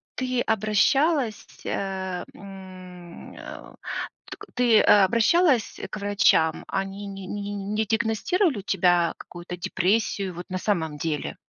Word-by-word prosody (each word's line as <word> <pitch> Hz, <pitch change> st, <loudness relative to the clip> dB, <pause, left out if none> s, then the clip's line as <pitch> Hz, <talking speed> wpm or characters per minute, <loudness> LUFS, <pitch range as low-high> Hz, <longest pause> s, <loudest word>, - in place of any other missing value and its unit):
ты 255 Hz, -1 st, -1 dB
обращалась, 225 Hz, -, +1 dB, 0.2 s
э, 190 Hz, -2 st, -3 dB
м, 185 Hz, -3 st, -11 dB
э, -, -, -10 dB, 0.6 s
т -, -, -6 dB, 0.2 s
ты 240 Hz, -3 st, +5 dB
обращалась 230 Hz, -, +4 dB
к -, -, -4 dB
врачам? 200 Hz, -5 st, +2 dB
Они 195 Hz, +1 st, -4 dB
не 195 Hz, -1 st, -8 dB
не 205 Hz, -1 st, -4 dB
не -, -, -4 dB
не 215 Hz, +2 st, -1 dB
диагностировали 230 Hz, -, +1 dB
у -, -, -6 dB
тебя 175 Hz, -3 st, +2 dB
какую-то 175 Hz, 0 st, -9 dB
депрессию 190 Hz, +1 st, 0 dB
вот 175 Hz, -, -7 dB
на 185 Hz, -, -2 dB
самом 160 Hz, -8 st, -1 dB
деле? 150 Hz, 0 st, -3 dB
200 Hz, 125 wpm, -25 LUFS, 180-220 Hz, 0.6 s, ты